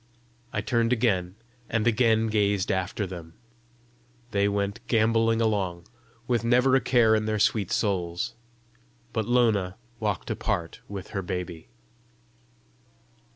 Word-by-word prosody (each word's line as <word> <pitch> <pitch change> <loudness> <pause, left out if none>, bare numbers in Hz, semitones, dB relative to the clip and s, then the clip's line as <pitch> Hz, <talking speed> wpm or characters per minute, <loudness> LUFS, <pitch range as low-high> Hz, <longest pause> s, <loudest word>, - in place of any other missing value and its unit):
I 105 - -1
turned 115 +1 +1
again, 100 -7 +1 0.3
and 115 -1 0
again 115 -1 +3
gazed 105 -3 +1
after 95 +2 -1
them: 85 -3 -9 1.0
they 100 -1 +2
went 100 0 -1
gamboling 115 0 +3
along, 95 -6 -1 0.4
with 120 -2 +1
never 125 +3 +4
a 135 - +4
care 115 -3 +4
in 110 0 +2
their 110 0 0
sweet 105 -2 +2
souls. 90 -5 -1 0.8
But 110 -2 -1
Lona 110 -7 +2 0.2
walked 105 -4 -2
apart 85 -1 -2
with 100 -2 -7
her 100 - -3
baby. 90 -1 -5
105 Hz, 120 wpm, -26 LUFS, 95-115 Hz, 1.0 s, never